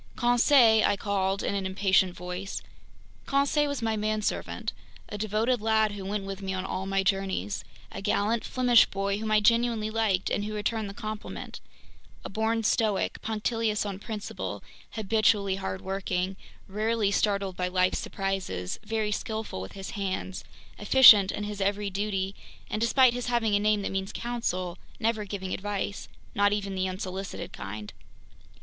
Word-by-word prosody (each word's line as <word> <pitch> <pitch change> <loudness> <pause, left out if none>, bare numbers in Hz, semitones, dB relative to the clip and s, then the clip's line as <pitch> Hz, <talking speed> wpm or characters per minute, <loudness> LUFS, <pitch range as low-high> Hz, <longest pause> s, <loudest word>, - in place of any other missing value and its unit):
"Conseil!" 240 -2 +5
I 200 - +2
called 195 -1 -1
in - - -1
an 195 -1 -1
impatient 190 -1 +2
voice. 180 +2 -5 0.6
Conseil 280 +2 +2
was 285 -4 -3
my 225 -1 +1
manservant. 215 0 -2 0.4
A - - -5
devoted 215 +3 0
lad 220 -1 +3
who 205 -1 -6
went 200 +1 -3
with 195 0 -6
me 190 -1 -3
on 185 0 -3
all 190 0 -3
my 195 0 +1
journeys; 190 - -1 0.3
a - - -6
gallant 210 +3 +1
Flemish 250 -2 +4
boy 200 +1 -2
whom 220 0 -3
I 215 0 +5
genuinely 230 -1 +2
liked 215 -4 +1
and 205 - 0
who 215 +1 -4
returned 215 0 -1
the 200 - -9
compliment; 215 -1 -6 0.7
a - - -4
born 225 +2 0
stoic, 215 -2 +1
punctilious 220 -1 -1
on 195 -2 -4
principle, 210 0 -5 0.3
habitually 210 -2 +2
hardworking, 190 -1 -2 0.3
rarely 215 +1 0
startled 200 -2 0
by 180 0 -1
life's 185 0 +1
surprises, 190 - -3
very 215 0 -1
skillful 220 - -3
with 95 - -8
his 195 -1 -7
hands, 190 -2 -3 0.4
efficient 210 -3 +8
in 210 - -4
his 205 -1 -5
every 200 +1 0
duty, 195 -1 -2 0.4
and 215 - -2
despite 245 +1 +5
his 245 0 -4
having 235 -3 +1
a - - +3
name 210 0 +2
that - - -2
means 195 0 -2
"counsel," 185 -7 -3 0.2
never 225 -2 0
giving 190 -2 -4
advice—not 205 0 -2
even 200 -1 -2
the 185 0 -1
unsolicited 190 +1 -5
kind! 105 +1 -7
205 Hz, 155 wpm, -28 LUFS, 195-220 Hz, 0.7 s, efficient